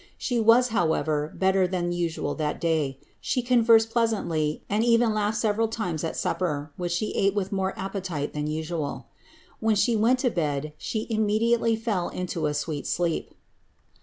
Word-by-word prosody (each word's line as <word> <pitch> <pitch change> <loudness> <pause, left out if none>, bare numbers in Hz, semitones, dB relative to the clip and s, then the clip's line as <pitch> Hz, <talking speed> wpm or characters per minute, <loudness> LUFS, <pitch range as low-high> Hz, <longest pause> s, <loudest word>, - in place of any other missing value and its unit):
She 245 -2 -1
was, 230 +3 +5
however, 160 -6 0
better 190 -1 +2
than 175 -1 -1
usual 170 -2 -2
that 150 -1 -2
day; 155 -5 0 0.2
she 250 - -1
conversed 230 -2 +4
pleasantly, 170 -10 0
and 210 +2 +1
even 230 -1 +3
laughed 215 +1 0
several 220 +1 +1
times 180 -8 -3
at 165 - -3
supper, 150 -5 -2
which 175 -1 -3
she 210 +5 -1
ate 195 0 +1
with 195 -2 -1
more 190 -1 -1
appetite 190 -6 -4
tlian 150 0 -2
usimI. 155 -1 -3 0.5
When 220 -1 +2
she 230 +3 +2
went 230 +4 +3
to 250 - +2
bed 150 -3 -2
she 220 -1 -3
inmiediately 225 +1 +2
fell 210 -6 -1
into 175 -3 -3
a 150 - -2
sweet 150 -1 -3
sleep.'' 170 -2 -1
190 Hz, 165 wpm, -26 LUFS, 160-225 Hz, 0.5 s, was